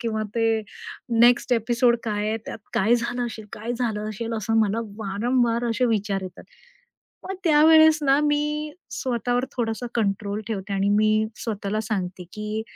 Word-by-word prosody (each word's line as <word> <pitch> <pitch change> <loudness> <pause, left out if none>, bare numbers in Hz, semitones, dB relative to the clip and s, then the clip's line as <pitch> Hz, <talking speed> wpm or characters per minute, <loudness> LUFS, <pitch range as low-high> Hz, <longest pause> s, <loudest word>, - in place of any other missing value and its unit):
किंवा 220 -2 -2
ते 225 -1 +2 0.6
next 240 +1 +5
episode 235 +1 +3
काय 210 -1 -1
आहे, 220 - 0
त्यात - - -6 0.2
काय 220 +5 +3
झालं 240 +1 -1
असेल, 220 -2 -7
काय 225 +3 -4
झालं 220 -3 -2
असेल, 225 +2 -5
असं 225 +1 0
मला 215 +2 +1 0.2
वारंवार 230 +3 0
असे 240 +3 +1
विचार 200 -2 -2
येतात. 185 -1 -9 0.8
मग 385 - -3
त्यावेळेस 315 0 +6
ना, 275 0 +4
मी 300 +1 0 0.2
स्वतःवर 245 0 -1
थोडासा 235 0 -2
कंट्रोल 205 -1 -1
ठेवते. 200 -2 -4
आणि 195 +1 +1
मी 215 0 +3 0.2
स्वतःला 215 -1 -2
सांगते, 185 -5 -4
की 215 0 -4
225 Hz, 150 wpm, -24 LUFS, 210-245 Hz, 0.8 s, त्यावेळेस